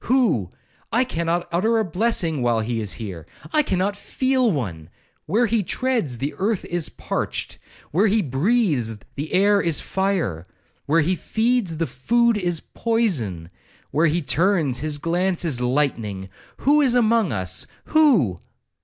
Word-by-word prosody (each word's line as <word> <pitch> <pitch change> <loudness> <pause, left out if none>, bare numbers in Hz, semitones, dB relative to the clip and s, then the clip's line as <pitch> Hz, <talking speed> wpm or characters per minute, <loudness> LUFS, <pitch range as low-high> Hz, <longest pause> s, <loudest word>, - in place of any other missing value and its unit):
—Who?—I 235 - 0
cannot 170 -6 -2
utter 220 +7 +2
a 220 - +1
blessing 175 - 0
while 120 -2 +1
he 115 +1 -2
is 105 -3 -1
here. 90 -8 -7 0.3
I 305 - +5
cannot 195 -5 -1
feel 260 +3 +1
one. 90 - -4 0.4
Where 220 +9 +2
he 225 -1 +1
treads, 225 - -1
the 135 +5 -3
earth 205 +1 0
is 175 -2 -1
parched!—Where 195 +8 -3
he 210 +1 +2
breathes, 140 - +1 0.2
the 150 +3 -5
air 200 +2 +4
is 165 -3 +1
fire!—Where 165 - -2
he 180 +5 +1
feeds, 220 -4 0
the 165 - 0
food 235 - +1
is 175 -5 -1
poison!—Where 145 - -2
he 165 +2 0
turns, 155 -2 +1
his 150 0 -2
glance 175 +3 0
is 135 -7 +1
lightning!—Who 125 - -1
is 255 -4 +3
among 230 -4 +3
us?—Who?' 105 - +1
170 Hz, 130 wpm, -22 LUFS, -, 0.4 s, I